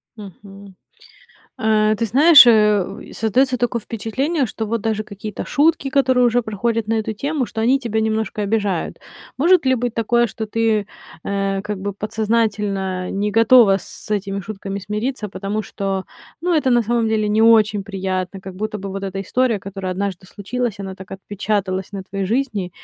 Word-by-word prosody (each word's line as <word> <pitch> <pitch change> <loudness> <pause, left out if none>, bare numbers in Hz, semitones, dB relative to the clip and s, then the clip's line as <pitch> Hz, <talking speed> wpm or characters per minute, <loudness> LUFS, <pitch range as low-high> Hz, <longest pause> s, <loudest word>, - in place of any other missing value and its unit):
Мгм. 200 -1 -12 0.8
Э, 215 -1 +2
ты 230 - -1
знаешь, 285 +4 +8
э, 210 -4 +2
создаётся 250 +4 +1
такое 240 -1 -1
впечатление, 265 +8 -2
что 220 0 -5
вот 230 +1 -2
даже 220 -1 -1
какие-то 205 0 -7
шутки, 305 -1 +2
которые 260 -2 +3
уже 240 +1 +2
проходят 220 +1 -2
на 225 - +1
эту 220 0 -1
тему, 280 +3 -2
что 220 +1 -5
они 260 +4 +3
тебя 225 -4 -2
немножко 220 -1 -1
обижают. 200 -4 -1 0.4
Может 335 0 +4
ли 260 - +4
быть 240 -1 -2
такое, 235 +1 +2
что 220 0 -5
ты, 220 0 +1
э, 205 - -10 0.4
э, 195 -1 -1
как 210 -2 -4
бы 200 +1 -4
подсознательно 205 -3 -1
не 205 +1 -1
готова 225 -2 +6
с 210 - -12
этими 200 -1 -2
шутками 195 0 -6
смириться, 210 +3 -3
потому 205 +2 -3
что, 195 -2 -3 0.4
ну, 350 +1 0
это 290 -4 +2
на 240 -1 +4
самом 230 0 0
деле 215 -1 0
не 215 +1 +2
очень 215 -2 +4
приятно. 190 -1 -3
Как 190 -1 -9
будто 210 +2 -4
бы 195 - -6
вот 195 +1 -5
эта 195 0 -4
история, 235 +3 0
которая 195 -1 -5
однажды 190 -1 -4
случилась, 220 +3 -4
она 190 -1 -6
так 190 -1 -13
отпечаталась 195 0 -3
на 195 - -5
твоей 195 +1 -4
жизни, 220 -5 -1
215 Hz, 175 wpm, -20 LUFS, 195-235 Hz, 0.8 s, знаешь